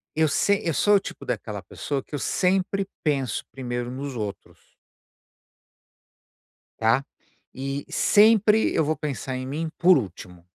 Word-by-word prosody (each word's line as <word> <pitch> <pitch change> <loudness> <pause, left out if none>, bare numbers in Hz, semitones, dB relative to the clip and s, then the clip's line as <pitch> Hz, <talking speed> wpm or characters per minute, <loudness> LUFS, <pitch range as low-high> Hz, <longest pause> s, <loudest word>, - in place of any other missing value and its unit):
Eu 160 0 +3
se 200 +7 +2
eu 165 - +1
sou 205 +6 +4
o - - +5
tipo 140 - -9
daquela 105 -5 -4
pessoa 135 +8 -4
que 150 - -7
eu - - -3
sempre 190 +4 0 0.2
penso 140 -5 0
primeiro 120 -2 -4
nos 135 0 -5
outros. 105 -3 -8 2.0
Tá? 115 +5 +3 0.5
E 135 +2 -4
sempre 215 0 +4
eu 160 - +2
vou 155 +1 0
pensar 135 -3 -4
em 130 - -5
mim 155 +4 -3
por 180 0 +6
último. 90 -6 -7
140 Hz, 140 wpm, -25 LUFS, 125-180 Hz, 2.0 s, por